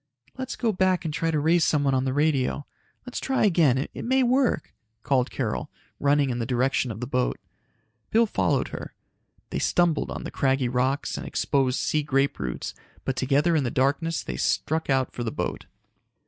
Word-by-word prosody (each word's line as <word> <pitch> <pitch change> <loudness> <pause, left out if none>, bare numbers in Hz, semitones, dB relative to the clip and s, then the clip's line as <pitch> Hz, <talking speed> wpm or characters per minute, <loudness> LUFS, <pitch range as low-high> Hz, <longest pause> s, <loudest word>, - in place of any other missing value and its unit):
"Let's 260 -1 -5
go 230 -3 +1
back 185 -2 +1
and 155 - -2
try 165 +1 0
to 155 -2 +1
raise 165 +3 +3
someone 145 -3 +2
on 130 0 +1
the 130 - 0
radio. 145 -1 +1 0.4
Let's 250 - -5
try 265 -4 +1
again, 160 -9 +4
it 135 - -4
may 260 +2 +3
work," 255 - +1 0.3
called 130 -2 +2
Carol, - - -3 0.3
running 140 -1 +3
in 120 - -2
the 115 - -1
direction 130 +1 +1
of 110 0 -6
the - - -1
boat. 125 0 0 0.7
Bill 230 +1 +4
followed 210 - 0
her. - - -7 0.6
They - - -1
stumbled 170 -3 +2
on - - -5
the - - -6
craggy 135 -2 +1
rocks 130 +3 0
and - - -6
exposed 135 -2 +1
sea 155 - +1
grape 140 -1 0
roots, 65 -2 -4 0.3
but 135 - -1
together 145 +6 +2
in 150 - +2
the 125 - 0
darkness 145 +6 0
they - - -5
struck 160 -1 0
out 135 -2 +2
for 120 - -4
the 115 - -2
boat. - - -4
140 Hz, 190 wpm, -26 LUFS, 130-165 Hz, 0.7 s, again